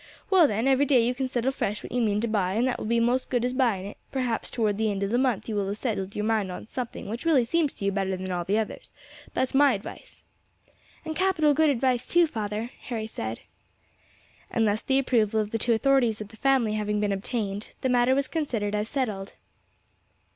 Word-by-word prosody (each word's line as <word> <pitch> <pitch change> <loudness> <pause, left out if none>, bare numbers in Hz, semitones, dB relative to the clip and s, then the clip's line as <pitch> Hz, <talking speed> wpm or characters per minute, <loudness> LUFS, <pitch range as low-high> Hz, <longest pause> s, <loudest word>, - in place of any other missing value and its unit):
Well 360 -5 +7
then, 220 +3 0
every 270 +1 +4
day 250 -4 +4
you 245 - +1
can 260 +1 -2
settle 250 0 0
fresh 210 -6 -3
what - - -8
you 245 - 0
mean 210 -2 +1
to 235 - 0
buy, 195 -4 0
and 235 +5 +2
that 255 - -1
will - - -4
be 235 +1 +2
most 245 +2 +2
as - - -33
good 245 -2 +1
as 250 - -1
buying 235 -8 +1
it; 205 - -8
perhaps 250 -4 -2
towards 215 -4 0
the 220 -1 +2
end 200 -1 -2
of 200 - -1
the 240 - +2
month 255 -6 0
you 225 - -3
will 200 -2 -1
have 200 +1 -3
settled 200 -5 -3
yer 210 - -2
mind 215 -3 0
on 180 - -7
to - - -25
something 245 -5 -5
which 230 +4 -5
really 300 -8 +4
seems 310 +3 +1
to 200 - -6
you 200 - +2
better 190 -1 -1
than 185 0 -5
all 175 -1 -1
the 195 +5 0
others: 220 -1 -4 0.4
that's 260 - 0
my 280 -1 +5
advice." 200 - -9 0.8
"And 315 - -4
capital 355 -5 +3
good 315 +1 +3
advice 255 -2 +1
too, 345 0 +4
father," 220 -3 -4 0.2
Harry 225 -3 -3
said. 110 - -5 1.1
And 225 -1 +1
thus 205 +1 0
the 265 - +1
approval 225 -5 +2
of 210 -1 -2
the 225 - -1
two 235 +2 +2
authorities 240 -2 +2
of 210 -1 -7
the 220 - -14
family 260 -4 +2
having 210 -1 -1
been 205 -1 0
obtained, 200 +1 -3
the - - +1
matter 250 +1 +3
was 275 0 0
considered 235 -10 -2
as 210 +1 -1
settled. 215 -9 -3
230 Hz, 235 wpm, -26 LUFS, 210-260 Hz, 1.1 s, Well